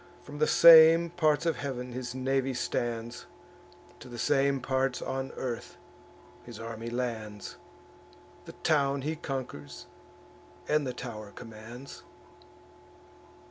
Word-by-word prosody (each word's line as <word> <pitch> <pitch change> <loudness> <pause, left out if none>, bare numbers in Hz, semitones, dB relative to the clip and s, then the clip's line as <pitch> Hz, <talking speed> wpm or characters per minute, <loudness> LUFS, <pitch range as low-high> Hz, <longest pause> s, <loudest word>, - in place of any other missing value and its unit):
From 145 0 -9
the 155 - +3
same 165 0 +8
parts 155 -2 +1
of 165 -2 +1
heav'n 125 -3 -5
his 125 0 -5
navy 135 0 0
stands, 120 -1 -3 0.7
To 125 - -12
the 120 - -8
same 140 +2 +2
parts 130 0 0
on 135 0 -4
earth; 120 -2 -5 0.7
his 120 -3 -10
army 115 0 -6
lands; 110 -4 -5 0.9
The - - -10
town 140 -3 +2
he 155 +2 -2
conquers, 75 - -6 0.8
and 150 -2 +1
the 125 - -3
tow'r 110 -5 -7
commands." 120 +3 -10
130 Hz, 115 wpm, -29 LUFS, 120-140 Hz, 0.9 s, same